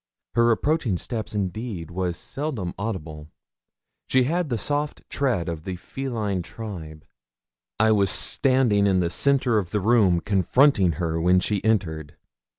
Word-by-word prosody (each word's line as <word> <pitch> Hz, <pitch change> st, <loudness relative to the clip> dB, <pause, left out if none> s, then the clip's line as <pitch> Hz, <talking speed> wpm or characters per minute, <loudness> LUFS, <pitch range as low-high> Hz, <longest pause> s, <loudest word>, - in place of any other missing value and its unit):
Her 115 Hz, 0 st, +4 dB
approaching 120 Hz, -, +1 dB
step, 110 Hz, +3 st, -4 dB
indeed, 95 Hz, -3 st, -4 dB
was 90 Hz, -1 st, -2 dB
seldom 125 Hz, -, -4 dB
audible; 80 Hz, -8 st, -5 dB, 0.8 s
she 130 Hz, -1 st, +3 dB
had 165 Hz, +4 st, -1 dB
the 120 Hz, -, 0 dB
soft 145 Hz, +7 st, -2 dB
tread 125 Hz, -12 st, 0 dB
of 80 Hz, -2 st, -4 dB
the 95 Hz, +1 st, -4 dB
feline 110 Hz, -3 st, -3 dB
tribe. 85 Hz, -7 st, -8 dB, 0.7 s
I 110 Hz, 0 st, +4 dB
was 100 Hz, -3 st, +3 dB
standing 120 Hz, -4 st, +2 dB
in 95 Hz, -2 st, +3 dB
the 85 Hz, -2 st, 0 dB
centre 130 Hz, -4 st, +2 dB
of 90 Hz, -4 st, -5 dB
the 105 Hz, -, -1 dB
room 100 Hz, -4 st, +3 dB
confronting 100 Hz, -, +3 dB
her 80 Hz, +1 st, -2 dB
when 90 Hz, +2 st, +4 dB
she 100 Hz, +1 st, -1 dB
entered. 80 Hz, -9 st, -1 dB
100 Hz, 145 wpm, -24 LUFS, 90-120 Hz, 0.8 s, Her